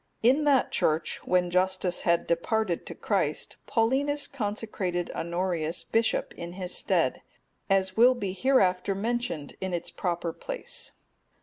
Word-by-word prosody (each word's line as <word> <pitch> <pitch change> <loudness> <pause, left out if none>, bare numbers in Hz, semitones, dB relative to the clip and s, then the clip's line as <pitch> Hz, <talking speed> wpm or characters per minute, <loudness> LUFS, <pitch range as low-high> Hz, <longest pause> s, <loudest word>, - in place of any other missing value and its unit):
In 270 +6 +4
that 280 -3 +3
church, 155 +1 0
when 180 -1 +2
Justus 185 0 +1
had 170 -1 +2
departed 175 +2 0
to - - -7
Christ, - - -1
Paulinus 280 +5 +1
consecrated 205 -8 -3
Honorius 170 -1 -2
bishop 225 +6 0
in 170 0 -7
his 180 -1 -4
stead, - - +1 0.5
as 190 -1 +2
will 245 +3 +6
be 200 -6 -3
hereafter 195 -5 +2
mentioned 215 - -2
in 190 -2 -1
its 170 - -4
proper 170 -2 -2
place. - - -3
190 Hz, 130 wpm, -28 LUFS, 175-230 Hz, 0.5 s, will